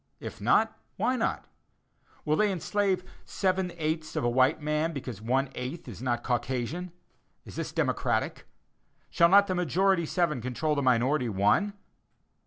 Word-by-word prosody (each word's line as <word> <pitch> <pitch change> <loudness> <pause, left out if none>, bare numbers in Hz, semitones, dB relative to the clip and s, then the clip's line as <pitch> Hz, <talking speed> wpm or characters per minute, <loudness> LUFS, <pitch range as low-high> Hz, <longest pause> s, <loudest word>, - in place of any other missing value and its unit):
If - - -8
not, - - +2 0.2
why 255 - +1
not? 230 - -1 0.8
Will 155 0 +2
they 210 +3 +2
enslave 190 +1 0 0.2
seven 185 -2 -1
eighths 155 0 -2
of - - -1
a 120 - +2
white 130 +4 +3
man 150 +2 -1
because 125 -7 -6
one 130 +4 0
eighth 130 +6 -6
is 110 -3 -9
not 120 -2 -1
Caucasian? 130 +8 -2 0.5
Is - - -11
this - - -4
democratic? - - -1 0.6
Shall 170 -1 +5
not 200 +2 +7
the 190 - -2
majority 180 +1 +1
seven 170 -8 0
control 130 +6 -1
the 145 - 0
minority 125 +1 +2
one? 105 - +2
155 Hz, 150 wpm, -28 LUFS, 125-180 Hz, 0.8 s, not